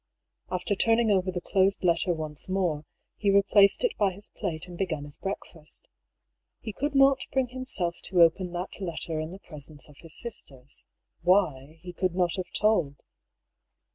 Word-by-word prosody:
After 185 +3 -1
turning 225 +2 +3
over 185 -1 +2
the 180 - -3
closed 195 +2 +1
letter 175 0 +3
once 155 0 -3
more, 175 -6 0 0.3
he 205 - +1
replaced 200 - +5
it 485 - +1
by 205 -2 +4
his 200 +3 -3
plate 180 -4 -2
and 175 - -9
began 170 -5 -2
his 145 -1 -5
breakfast. 190 - -6 0.7
He 220 - -6
could 290 +4 -2
not 270 0 +6
bring 265 -2 +1
himself 245 -9 -1
to 180 -2 +5
open 175 +2 +2
that 180 +3 -5
letter 165 -3 -3
in 155 0 -4
the 185 - -8
presence 150 -5 -8
of 145 - -17
his 165 -2 -8
sisters. 140 - -5 0.4
.Why, 165 -5 +2
he 180 -1 -8
could 180 0 -1
not 180 -2 +1
have 185 - -4
told. 195 -10 +2
180 Hz, 170 wpm, -27 LUFS, 160-200 Hz, 0.7 s, not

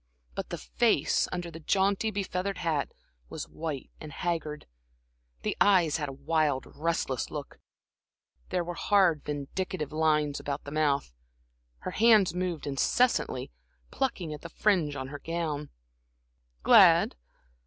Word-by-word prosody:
But - - -5
the - - -4
face, - - +1
under 175 -1 -4
the 165 - -9
jaunty, 195 +5 +1
be 205 -1 -2
feathered 185 +1 -3
hat, 160 -5 -1 0.4
was - - -6
white 155 -4 -5
and 155 - -8
haggard, 155 -2 -3 0.8
the - - -1
eyes 180 -7 +5
had 145 -3 -3
a - - -5
wild 145 0 0
restless 155 -5 -1
look, 145 -2 -7 0.9
there 180 - 0
were 175 +1 -5
hard, 180 -4 +3
vindictive 150 +2 -4
lines 150 -2 +1
about 140 0 -4
the 140 - -8
mouth. 145 - 0 0.7
Her 185 - -4
hands 215 -5 +5
moved 180 -3 -2
incessantly, 145 - +1 0.4
plucking 190 - -2
at 150 - -8
the 170 - -8
fringe 170 -6 +1
on 130 -1 -5
her 145 0 -7
gown. 155 -3 -3 0.9
"Glad? - - +7
160 Hz, 135 wpm, -29 LUFS, 145-180 Hz, 0.9 s, Glad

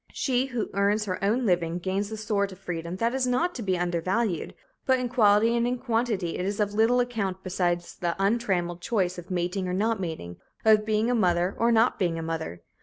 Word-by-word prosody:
She 260 -1 0
who 245 -4 -3
earns 205 +2 +1
her 185 -1 -4
own 230 +5 +1
living 175 -3 +1
gains 195 +3 -2
a 220 - -4
sort 205 -2 -1
of 185 - -10
freedom 175 -2 -5
that 230 +5 0
is 260 -1 0
not 330 +9 +1
to 250 - -6
be 190 -4 0
undervalued, 175 +2 -1 0.3
but 260 -1 +3
in 250 -1 -2
quality 225 -1 +4
and 235 0 +1
in 250 +1 -1
quantity 230 -7 -1
it - - -1
is 200 +2 -2
of 205 -1 0
little 225 +4 +3
account 205 -6 -2
beside 175 -2 0
the 170 0 -4
untrammeled 195 -4 0
choice 185 -4 0
of 175 - -12
mating 180 +1 -1
or 180 - -2
not 220 +2 +1
mating, 160 - -5 0.3
of 215 -1 +5
being 220 +2 +1
a - - +2
mother 180 -4 +2
or 235 +1 +2
not 230 +1 +3
being 170 -3 0
a 165 - -4
mother. 160 - -4
200 Hz, 215 wpm, -26 LUFS, 180-230 Hz, 0.3 s, of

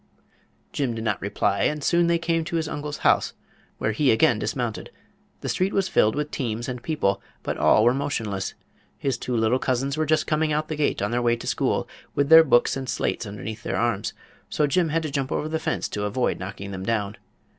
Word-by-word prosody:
Jim 130 -5 -1
did 110 - -4
not 105 -3 -1
reply, 100 0 0
and 150 -1 0
soon 170 +2 +3
they 170 0 +3
came 165 0 0
to 170 +2 -4
his 160 -2 0
uncle's 145 0 -4
house, - - +3 0.4
where 110 - 0
he 135 +5 +2
again 110 - +4
dismounted. - - -3 0.5
The - - -4
street 185 +2 0
was 195 -1 +1
filled 110 -11 +3
with 150 0 -2
teams 120 -2 -3
and 125 -2 -5
people, 135 -12 0 0.2
but - - -2
all 110 - +5
were 120 +2 +5
motionless. 115 -9 -2 0.4
His 135 -3 -1
two 125 -2 -2
little 115 +3 +2
cousins 135 +3 -1
were 155 -1 0
just 155 +1 +2
coming 155 0 +1
out 155 +1 -1
the 155 - -2
gate 145 -8 0
on 105 - -1
their 120 +1 +1
way 120 -1 +3
to 120 - -9
school, - - 0 0.3
with 140 0 +1
their 160 0 +10
books 120 -5 +3
and 135 -1 -5
slates 115 - -1
underneath 105 +2 -6
their - - -2
arms; 115 -4 0 0.4
so 150 - +1
Jim 165 +4 +1
had 165 +2 0
to 155 - -3
jump 135 -1 -2
over 155 - -1
the 160 0 -2
fence - - -2
to 105 0 -3
avoid 115 +5 0
knocking 100 +1 -6
them 95 -1 -5
down. 105 -1 -1
130 Hz, 220 wpm, -24 LUFS, 110-155 Hz, 0.5 s, their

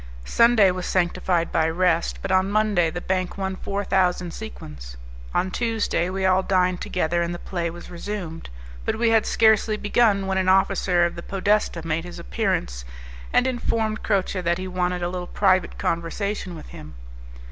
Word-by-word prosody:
Sunday 230 - +5
was 180 -1 -4
sanctified 175 -1 0
by 160 -1 +2
rest, 170 0 +1
but 195 - -2
on 190 +1 +3
Monday 205 -5 +2
the 175 - -5
bank 185 +1 -2
won 190 -1 -2
four 200 +1 -3
thousand 180 -3 +1
sequins. 70 - -9 0.3
On 190 - 0
the - - -7
Tuesday 225 -6 0
we 190 0 -2
all 190 0 +4
dined 185 -2 +1
together, 175 -1 0
and 170 0 -2
the - - -5
play 175 -1 -3
was 175 +2 -10
resumed; 175 -2 -6 0.3
but - - -1
we 230 0 +2
had 225 -1 +3
scarcely 220 -1 +3
begun 205 -2 +2
when 190 0 0
an 185 0 +1
officer 185 -2 +3
of 170 - -2
the 170 - -7
podesta 195 -3 0
made 165 0 -1
his 175 0 -9
appearance - - -2 0.5
and 250 - +3
informed 225 -4 -1
Croce 195 -2 0
that 170 0 0
he 185 0 -5
wanted 180 -1 -1
a - - 0
little 180 0 -5
private 185 -3 +1
conversation 180 +2 -2
with 155 - -10
him. 75 -1 -11
185 Hz, 180 wpm, -23 LUFS, 175-200 Hz, 0.5 s, Sunday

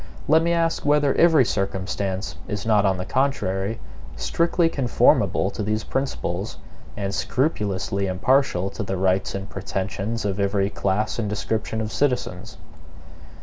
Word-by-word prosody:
Let 160 +2 +5
me 170 +1 +1
ask 165 -1 +1
whether 145 -1 +3
every 160 -6 +5
circumstance 95 -1 -2
is 105 0 -4
not, 105 -3 +4
on 95 -1 +1
the 90 - -4
contrary, 110 -6 0 0.4
strictly 170 0 +1
conformable 135 -7 +2
to - - -5
these 110 +1 -1
principles, 105 -8 -3 0.4
and 100 -1 -2
scrupulously 100 - -1
impartial 95 -1 +1
to - - -6
the 95 -1 -2
rights 95 +1 +1
and 95 0 -5
pretensions 100 +3 -3
of 100 0 -1
every 100 0 +1
class 105 +4 -1
and 105 -3 -1
description 110 +1 -2
of 110 0 -3
citizens? 125 - -1
105 Hz, 140 wpm, -23 LUFS, 95-130 Hz, 0.4 s, Let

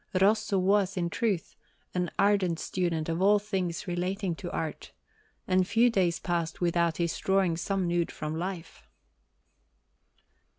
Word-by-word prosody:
Rosso 210 +1 +3
was, 195 0 +2
in 170 -1 -1
truth, 200 -6 -1 0.4
an 180 -1 -1
ardent 195 -5 +2
student 170 -4 -1
of 165 +2 -1
all 205 +2 +6
things 190 -5 -3
relating 180 +1 -1
to 175 +2 -7
art, 160 -1 -5 0.5
and 185 -1 +2
few 235 +3 +4
days 180 -5 +2
passed 170 -2 -2
without 170 -1 +1
his 170 -1 0
drawing 190 -3 +2
some 190 +2 -1
nude 170 -1 0
from 155 0 -4
life. 175 0 -6
180 Hz, 135 wpm, -28 LUFS, 170-195 Hz, 0.5 s, all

